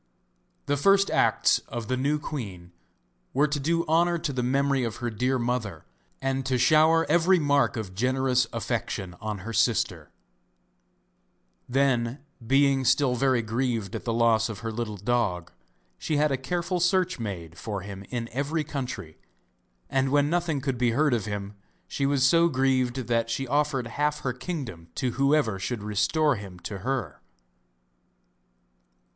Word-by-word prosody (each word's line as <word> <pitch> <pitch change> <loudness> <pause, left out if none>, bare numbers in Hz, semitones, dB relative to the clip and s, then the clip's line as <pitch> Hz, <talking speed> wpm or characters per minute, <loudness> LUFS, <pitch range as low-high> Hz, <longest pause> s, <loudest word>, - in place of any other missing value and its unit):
The 145 - 0
first 195 +6 +4
acts - - +3
of 120 -2 -5
the 130 - 0
new 140 +4 +1
queen 100 - -6 0.6
were 145 +3 +4
to 145 0 -2
do 165 +4 0
honour 170 +2 +2
to 155 -3 -3
the 125 - -1
memory 135 +1 +1
of 115 -2 -3
her 120 -1 -3
dear 125 +4 0
mother 120 -9 -3 0.3
and 135 0 -1
to 130 -1 +1
shower 155 +6 +4
every 175 +4 +4
mark 145 -5 +2
of 100 -4 -5
generous 130 +3 +1
affection 90 -2 -3
on 105 -2 -5
her 115 - -5
sister. 115 +1 +1 1.6
Then, 125 -2 +1 0.3
being 135 0 +3
still 130 0 +3
very 125 -1 +2
grieved 115 -3 -2
at - - -5
the 115 - -2
loss 115 -1 +3
of 110 -1 -7
her 115 0 -3
little 110 -2 -4
dog, 100 -5 -1 0.5
she 155 - -1
had 150 0 +2
a - - +2
careful 175 +7 -2
search 185 -1 +1
made 85 -7 -6
for 100 0 -5
him 100 0 -8
in 120 -2 -3
every 145 +5 -1
country, 125 - -6 0.7
and 135 0 +1
when 145 +2 +2
nothing 170 -5 0
could 130 -3 -2
be 120 -2 +2
heard 150 +2 +2
of 115 -3 0
him 105 -1 -5 0.3
she 140 - -1
was 140 -2 +2
so 170 +4 +5
grieved 130 -3 +1
that 115 -1 0
she 125 +4 -2
offered 145 -2 0
half 150 +5 -1
her 125 - -2
kingdom 125 - -6
to 125 - -1
whoever 135 -6 +2
should 105 +2 -3
restore 110 +8 +1
him 100 -3 -9
to 100 +2 -6
her. 130 +4 -3
130 Hz, 160 wpm, -26 LUFS, 115-145 Hz, 1.6 s, so